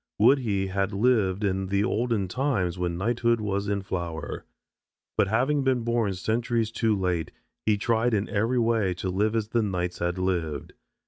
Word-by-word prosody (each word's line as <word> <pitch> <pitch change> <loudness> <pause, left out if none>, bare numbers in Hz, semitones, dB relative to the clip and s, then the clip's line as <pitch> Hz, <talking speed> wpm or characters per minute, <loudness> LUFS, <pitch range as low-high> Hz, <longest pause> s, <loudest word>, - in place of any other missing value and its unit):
Would 140 - +5
he 100 -6 0
had 95 +1 -1
lived 105 -3 +2
in 95 -1 0
the 100 +1 +1
olden 115 -3 0
times 100 -6 0
when 85 -1 -1
knighthood 115 +3 +1
was 100 -1 -2
in 100 -1 -1
flower. 85 -5 -4 0.7
But 100 - +3
having 135 +7 +1
been 130 -2 +2
born 115 -4 0
centuries 115 +3 0
too 110 -2 +1
late 90 -3 -1 0.4
he 105 -1 +4
tried 115 +2 +1
in 105 +1 0
every 115 +5 0
way 115 -6 +2
to 95 +1 -3
live 105 +4 +1
as 110 -2 -1
the 115 +1 +2
knights 90 -4 -2
had 85 +1 -1
lived. 85 -5 -2
105 Hz, 175 wpm, -26 LUFS, 95-115 Hz, 0.7 s, Would